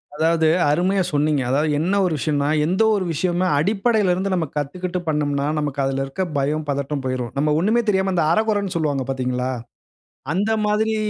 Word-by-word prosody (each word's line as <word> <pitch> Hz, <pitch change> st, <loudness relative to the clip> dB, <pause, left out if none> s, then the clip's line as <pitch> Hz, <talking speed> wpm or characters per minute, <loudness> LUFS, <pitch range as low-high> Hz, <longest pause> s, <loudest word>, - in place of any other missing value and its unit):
அதாவது 160 Hz, +1 st, +2 dB, 0.2 s
அருமையா 185 Hz, +5 st, +2 dB
சொன்னீங்க. 150 Hz, -1 st, +1 dB
அதாவது 145 Hz, +4 st, +1 dB
என்ன 180 Hz, +6 st, 0 dB
ஒரு 175 Hz, -, 0 dB
விஷயன்னா, 145 Hz, -1 st, 0 dB, 0.2 s
எந்த 185 Hz, +7 st, +2 dB
ஒரு 200 Hz, -, 0 dB
விஷயமே 175 Hz, +3 st, 0 dB
அடிப்படையில 205 Hz, +3 st, +2 dB
இருந்து 190 Hz, +2 st, -1 dB
நம்ம 175 Hz, -3 st, 0 dB
கத்துக்கிட்டு 180 Hz, +5 st, -3 dB
பண்ணம்னா, 145 Hz, -2 st, 0 dB
நமக்கு 145 Hz, -2 st, -3 dB
அதில 135 Hz, 0 st, -1 dB
இருக்க 135 Hz, +7 st, -5 dB, 0.2 s
பயம், 150 Hz, +3 st, -1 dB
பதட்டம், 140 Hz, 0 st, -2 dB
போயிரும். 130 Hz, -2 st, -2 dB
நம்ம 150 Hz, +2 st, +1 dB
ஒன்னுமே 220 Hz, +7 st, +2 dB
தெரியாம, 190 Hz, -1 st, +1 dB
அந்த 175 Hz, -, +2 dB
அரை 215 Hz, -, +3 dB
குறைன்னு 200 Hz, -3 st, -1 dB
சொல்வாங்க 145 Hz, -5 st, 0 dB
பார்த்தீங்களா? 125 Hz, -1 st, -1 dB, 0.8 s
அந்த 205 Hz, +5 st, 0 dB
மாதிரி 215 Hz, +1 st, +1 dB
160 Hz, 170 wpm, -21 LUFS, 140-190 Hz, 0.8 s, அரை